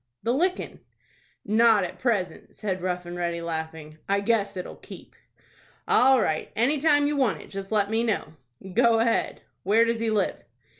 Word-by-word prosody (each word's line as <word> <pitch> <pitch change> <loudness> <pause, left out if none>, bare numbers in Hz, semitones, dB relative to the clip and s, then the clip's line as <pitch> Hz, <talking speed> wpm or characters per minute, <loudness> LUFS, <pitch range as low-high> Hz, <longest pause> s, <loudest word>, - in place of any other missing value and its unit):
"The 235 - +1
lickin'." 360 +7 -1 0.7
"Not 220 -1 +4
at 180 - -6
present," 200 -9 -2
said 190 -4 -3
Rough 180 -1 -3
and 175 0 -7
Ready, 170 -1 -2
laughing. 160 -2 -6
"I 200 0 +2
guess 205 -2 0
it'll 180 - -7
keep." - - -13 0.7
"All 265 +1 +5
right. 155 -7 -1
Any 265 +7 +2
time 290 -1 +3
you 295 +1 0
want 260 -7 +1
it, - - -13
just 195 0 -6
let 205 -1 +1
me 225 +1 +1
know." 220 -7 -2 0.4
"Go 235 +1 +4
ahead. 230 0 0 0.2
Where 220 +5 +3
does 230 -1 -1
he 230 0 0
live?" 210 -3 0
215 Hz, 170 wpm, -25 LUFS, 180-235 Hz, 0.7 s, All